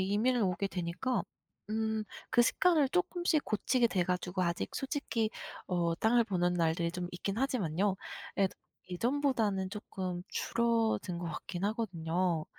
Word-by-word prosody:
이민을 215 +6 +2
오게 190 +1 0
되니까 180 +9 -1 0.5
음 220 0 0 0.3
그 240 - +5
습관을 305 +3 +4
쪼끔씩 350 -1 +1
고치게 235 +3 +2
돼 185 -5 +1
가지고 180 +1 -1
아직 170 0 -1
솔직히 265 -5 -1 0.4
어 170 -2 +1
땅을 235 +4 +4
보는 180 -4 +1
날들이 170 0 +1
좀 180 0 -3
있긴 195 +3 -3
하지만요. 200 - +1 0.4
그래도 195 -1 +2 0.4
예전보다는 225 -4 +1
쪼끔 185 -4 -4
줄어든 225 -6 +1
것 175 - -5
같긴 175 +3 -4
하거든요. 180 -6 0
200 Hz, 300 characters per minute, -32 LUFS, 180-235 Hz, 0.5 s, 그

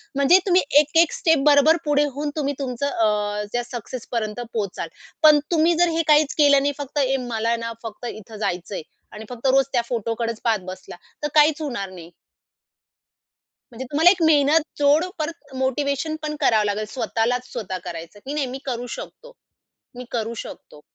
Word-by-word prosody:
म्हणजे 280 +7 +5
तुम्ही 365 0 +5 0.2
एक-एक 325 +3 +3
स्टेप 320 -3 +3
बरोबर 290 +3 +5
पुढे 290 0 +3
होऊन 295 +1 -2
तुम्ही 285 -2 -1
तुमचं 265 +1 -2
अ, 210 -4 0
त्या 245 0 0
सक्सेसपर्यंत 235 -2 -5
पोहोचाल. 200 -6 -3 0.4
पण 305 -1 +8
तुम्ही 335 +1 +3
जर 350 - +5
हे - - +3
काहीच 300 -1 +4
केलं 285 -2 +5
नाही 285 0 0
फक्त 285 +1 -4
ए 270 0 +2
मला 225 0 -2
आहे 235 - +1
ना 230 0 -5
फक्त 225 +2 -8
इथे 215 0 -10
जायचंय 185 -2 -3 0.3
आणि 215 +1 -9
फक्त 245 +2 -4
रोज 270 +1 +4
त्या 240 - +3
फोटोकडेचं 230 -1 -2
पाहत 225 -3 +2
बसला, 185 -1 -8 0.3
तर - - +1
काहीच 305 +1 +5
होणार 235 -10 -4
नाही. 175 -3 -11 1.6
म्हणजे 245 +2 -7
तुम्हाला 325 +4 +6
एक 370 -3 +1
मेहनत 300 0 +4 0.2
जोड 290 +4 +4
परत 315 -3 -6
मोटिव्हेशन 280 +4 -1
पण 300 0 -3
करावं 215 -2 +3
लागेल, 210 +1 -1
स्वतःलाच 245 +2 -2
स्वतः 195 -6 -4
करायचं 170 +4 -8
की 280 - -4
"नाही, 290 -3 -1
मी 260 +2 -6
करू 245 -2 -4
शकतो, - - -11 0.6
मी 250 0 -8
करू 230 -1 -2
शकतो." 150 - -13
260 Hz, 170 wpm, -22 LUFS, 225-295 Hz, 1.6 s, पण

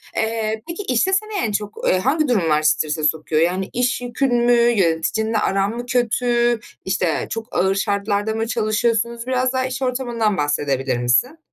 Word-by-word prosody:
Eee, 220 -1 -1
peki, 340 +4 -5
işte, 260 +6 +1
seni 430 +3 0
en 220 - -2
çok 210 0 -3 0.2
hangi, 305 +4 +2
eee, - - -2
durumlar 165 -10 +2
strese 155 0 +1
sokuyor? 155 0 +1
Yani, 185 +3 0
iş 250 +1 0
yükün 245 +1 0
mü, 240 0 +3
yöneticinle 220 -1 +2
aran 195 -1 +1
mı 240 - -5
kötü, 240 -1 +1 0.3
işte, 185 -3 -1
çok 225 0 -5
ağır 190 +2 +2
şartlarda 200 +2 -1
mı 225 0 -2
çalışıyorsunuz? 230 +1 0
Biraz 255 0 0
daha 260 0 0
iş 260 +1 -4
ortamından 240 -5 -1
bahsedebilir 140 -3 0
misin? 125 - +1
225 Hz, 160 wpm, -20 LUFS, 190-245 Hz, 0.3 s, mü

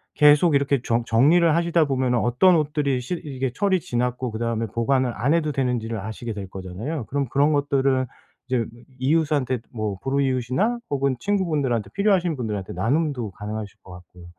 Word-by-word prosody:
계속 150 +2 +5
이렇게 140 -2 +2
정 115 0 0
정리를 155 +9 +4
하시다 170 -1 +2
보면은 130 -3 +1
어떤 125 +11 +4
옷들이 145 -3 0
실 170 +8 -4
이게 135 -3 -3
철이 190 +5 +1
지났고 125 -1 -2
그다음에 115 0 -2
보관을 125 +3 0
안 140 +6 +1
해도 160 -2 +1
되는지를 120 -5 -1
아시게 110 +3 -5
될 100 -3 -7
거잖아요. 100 - -5
그럼 140 -1 -1
그런 145 +4 +3
것들을 135 -2 +1 0.4
이제 125 -3 0 0.3
이 130 +2 0
이웃한테 145 -6 +1
뭐 105 -4 -3
불우이웃이나 135 - 0
혹은 140 -2 0
친구분들한테 145 - 0
필요하신 190 -5 +2
분들한테 105 -6 -4
나눔도 125 - -1
가능하실 105 +1 -6
것 95 - -13
같고요. 90 0 -14
130 Hz, 410 characters per minute, -23 LUFS, 115-150 Hz, 0.4 s, 계속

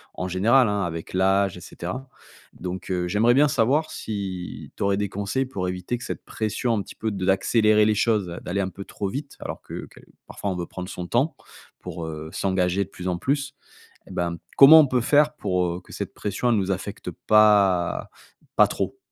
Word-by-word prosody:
en 90 - -3
général 115 +8 +4
hein, 105 -1 0
avec 85 -2 -5
l'âge 95 0 +2
et - - -11
cetera 125 +12 -7 0.4
donc, 90 +1 -6
heu, 90 -1 0
j'aimerais 105 +6 +3
bien 145 +4 +5
savoir 140 +5 +2
si 95 -4 -6
tu - - -3
aurais 100 0 +2
des 100 0 0
conseils 100 +8 -2
pour 95 -8 -3
éviter 90 +6 -3
que 120 - -10
cette - - -6
pression, 110 +2 -1
un 105 - 0
petit 95 - -11
peu 110 - -2
de 95 -2 -3
l'accélérer 105 +2 +3
les 105 0 +2
choses, 105 -3 +1 0.2
d'aller 95 +3 -2
un 95 - -1
peu 100 +2 -9
trop 100 - -5
vite 140 +7 -6
alors - - -6
que - - -8
quel - - -17 0.2
parfois 100 - -4
on - - -3
veut 85 - -3
prendre 90 +1 -7
son 90 -1 -6
temps, 135 - +1 0.4
pour, 85 - -6
heu, 80 0 -6
s'engager 95 0 +1
de 95 - -12
plus 90 -1 -7
en 90 -1 0
plus. 140 +7 -1 0.5
Eh - - -12
ben, 85 -1 -2 0.2
comment 155 +4 +10
on 150 - +6
peut 125 -1 +1
faire 150 +4 +3
pour, 90 -9 0
heu, 85 +1 -3
que - - -17
cette - - -5
pression, 105 +4 -2
elle - - +3
nous 95 -1 0
affecte 95 - -5
pas 100 -5 +3 0.5
pas - - +6
trop? - - -3
100 Hz, 210 wpm, -24 LUFS, 90-120 Hz, 0.5 s, comment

